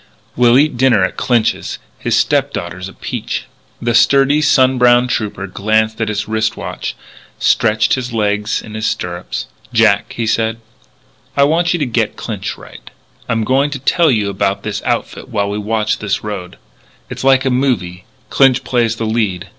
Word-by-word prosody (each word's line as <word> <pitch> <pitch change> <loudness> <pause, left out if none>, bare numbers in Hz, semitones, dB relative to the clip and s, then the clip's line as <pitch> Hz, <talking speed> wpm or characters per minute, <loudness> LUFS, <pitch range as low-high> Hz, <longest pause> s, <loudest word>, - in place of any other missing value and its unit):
We'll 120 0 +5
eat 145 -2 +2
dinner 120 -6 +4
at 95 - -1
Clinch's. 120 -3 0 0.2
His - - 0
stepdaughter 85 +1 0
is 95 +1 -6
a - - -13
peach." - - -4 0.3
The 120 0 -1
sturdy, 140 +5 +4
sun 130 -3 +3
browned 125 0 +4
trooper 105 -3 -2
glanced 110 +3 0
at 110 - 0
his 105 0 -2
wrist 110 0 -1
watch, - - -5 0.4
stretched 110 0 +2
his 125 -2 -2
legs 105 -1 -1
in 105 - -10
his 110 0 -2
stirrups. 90 -2 -4 0.3
"Jack," - - +2
he 115 - -2
said, 110 0 0 0.8
"I 140 - +5
want 170 +4 +2
you - - +1
to 150 - -1
get 120 - -1
Clinch - - -5
right, - - -13
and - - -28 0.4
I'm 115 -1 +1
going 135 +5 +2
to 145 - -4
tell 160 +5 +2
you 105 -6 +1
about 100 +1 -1
his 105 -1 -3
outfit 120 +1 -3
while 100 -4 -1
we 105 - -3
watch 105 0 -1
this 105 -1 -2
road. 100 -4 -6 0.5
It's - - -6
like 135 0 +4
a 130 - +2
movie. 105 -9 -1 0.3
Clinch 135 -2 +4
plays 120 -2 +1
the 115 - -3
lead. 100 -5 -1
115 Hz, 180 wpm, -16 LUFS, 105-130 Hz, 0.8 s, We'll